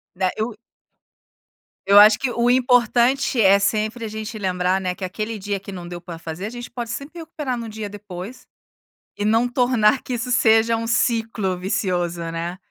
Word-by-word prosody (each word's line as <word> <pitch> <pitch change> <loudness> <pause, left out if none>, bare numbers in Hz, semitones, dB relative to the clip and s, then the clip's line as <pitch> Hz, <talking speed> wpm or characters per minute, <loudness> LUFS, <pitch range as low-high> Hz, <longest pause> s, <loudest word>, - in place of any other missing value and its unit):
Né. 185 -1 0
Eu 220 +1 -2 1.3
eu 200 +1 +7
acho 210 +1 +8
que 265 - -1
o 240 0 +1
importante 245 0 +3
é, 200 -1 +6
sempre, 215 +3 -1
a - - -3
gente 215 +1 -6
lembrar, 185 -1 0
né, 180 -1 -2
que 185 - -7
aquele 215 +4 -4
dia 200 0 -3
que 200 - -9
não 175 -2 -8
deu 175 0 -7
pra 170 -1 -9
fazer 165 +4 -6
a - - -5
gente 240 0 -8
pode 240 -2 -5
sempre 290 +7 -7
recuperar 300 -6 -4
no 230 -1 -6
dia 215 -1 -6
depois. 200 +2 -9 0.7
E 205 - -3
não 225 +3 +3
tornar 245 -1 +2
que 255 - -4
isso 245 +1 -3
seja 230 -2 +4
um 230 0 -3
ciclo 225 -5 0
vicioso, 180 -3 -1
né. 170 +2 -4
215 Hz, 185 wpm, -22 LUFS, 190-240 Hz, 1.3 s, acho